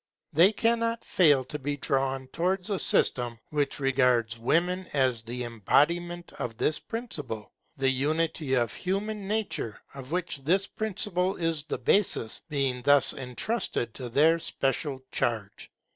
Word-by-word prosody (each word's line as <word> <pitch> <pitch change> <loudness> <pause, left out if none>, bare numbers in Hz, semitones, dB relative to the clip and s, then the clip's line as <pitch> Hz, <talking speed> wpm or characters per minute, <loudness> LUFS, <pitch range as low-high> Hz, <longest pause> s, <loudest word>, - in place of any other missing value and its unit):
They 175 +7 +6
cannot 230 +1 0
fail 145 -7 +4
to 150 +4 -6
be 145 +1 -2
drawn 135 -1 0
towards 185 +6 -1
a 195 - 0
system 120 -2 +2
which 145 -1 0
regards 125 -4 +2
women 175 +9 +1
as 130 -5 +2
the 120 +2 -5
embodiment 170 - +1
of 115 -2 -4
this 155 - +1
principle; 150 - -4 0.3
the 135 0 +1
unity 150 +1 0
of 120 -3 +1
human 200 +2 -3
nature, 205 - -2
of 135 0 -9
which 180 -3 -1
this 180 +8 +2
principle 195 -3 -1
is 165 -3 -1
the - - -3
basis, 180 - +1
being 135 -4 0
thus 145 +1 +4
entrusted 125 - -2
to 125 -2 -6
their 155 +7 +4
special 135 -2 -2
charge. 110 -4 -2
145 Hz, 140 wpm, -28 LUFS, 125-180 Hz, 0.3 s, They